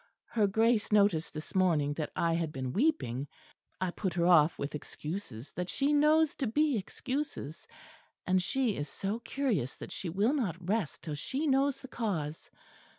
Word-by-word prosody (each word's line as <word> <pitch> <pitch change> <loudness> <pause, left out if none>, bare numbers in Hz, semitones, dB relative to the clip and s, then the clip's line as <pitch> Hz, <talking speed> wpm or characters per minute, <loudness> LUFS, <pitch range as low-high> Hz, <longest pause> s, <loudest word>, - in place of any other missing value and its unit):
Her 215 -3 +2
Grace 220 +2 +2
noticed 200 -6 +3
this 155 -1 -8
morning 165 -6 +3
that 150 0 -4
I 170 -1 +2
had 165 -2 -1
been 130 -2 -4
weeping; 170 - +1 0.5
I 185 -1 0
put 185 -2 -3
her 170 -1 +2
off 170 -3 +5
with 140 - -4
excuses 150 - -6
that 180 0 -3
she 285 +2 +1
knows 305 +1 +4
to 265 - -1
be 295 +4 +2
excuses; 255 - -4 0.6
and 185 0 +3
she 245 +2 +1
is 145 +1 -3
so 200 +4 -3
curious 235 - -1
that - - -8
she 180 - -4
will 205 - +2
not 230 - 0
rest 205 -6 -1
till 155 - -4
she 265 - -2
knows 275 -1 +2
the 265 - -8
cause. 165 - -3
195 Hz, 170 wpm, -31 LUFS, 155-260 Hz, 0.6 s, off